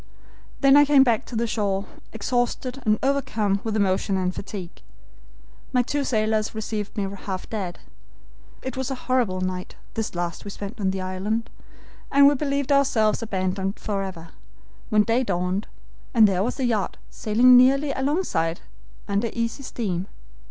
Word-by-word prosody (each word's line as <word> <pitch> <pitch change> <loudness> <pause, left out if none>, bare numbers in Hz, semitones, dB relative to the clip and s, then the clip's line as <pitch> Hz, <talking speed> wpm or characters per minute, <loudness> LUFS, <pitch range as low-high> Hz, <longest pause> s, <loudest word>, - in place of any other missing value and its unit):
"Then 275 -1 +6
I 290 - +8
came 285 -2 +6
back 235 -4 +1
to 245 - -8
the 230 +1 +1
shore, 205 -3 -1 0.3
exhausted 245 +3 -2
and 215 0 +4
overcome 220 -8 +1
with 220 -2 -2
emotion 195 -1 +1
and 185 0 0
fatigue. 190 -3 -7 0.9
My 250 -1 +4
two 285 +3 -1
sailors 215 -3 0
received 215 -1 -4
me 200 -1 0 0.2
half 190 -2 -4
dead. 190 -5 -3 0.9
It 260 -1 -4
was 265 0 -2
a 270 - -2
horrible 235 -8 +1
night 185 0 -4 0.2
this 225 -4 -3
last 175 -1 -3
we 205 - -6
spent 205 +3 -7
on 190 - +2
the 190 0 -2
island, 195 +5 -2 0.6
and 280 0 +7
we 285 - +6
believed 280 0 -1
ourselves 245 -7 +3
abandoned 190 -2 -2
forever, 190 -5 -4 0.6
when 210 -2 +4
day 230 +4 +1
dawned, 185 0 -1 0.5
and 220 -2 +8
there 190 -2 +1
was 230 - -1
the 265 - -1
yacht 220 -5 0
sailing 240 +4 +5
nearly 275 +3 +5
alongside, 265 - -1 0.5
under 205 +3 0
easy 230 +3 -2
steam. 195 -8 -3
215 Hz, 155 wpm, -24 LUFS, 195-255 Hz, 0.9 s, I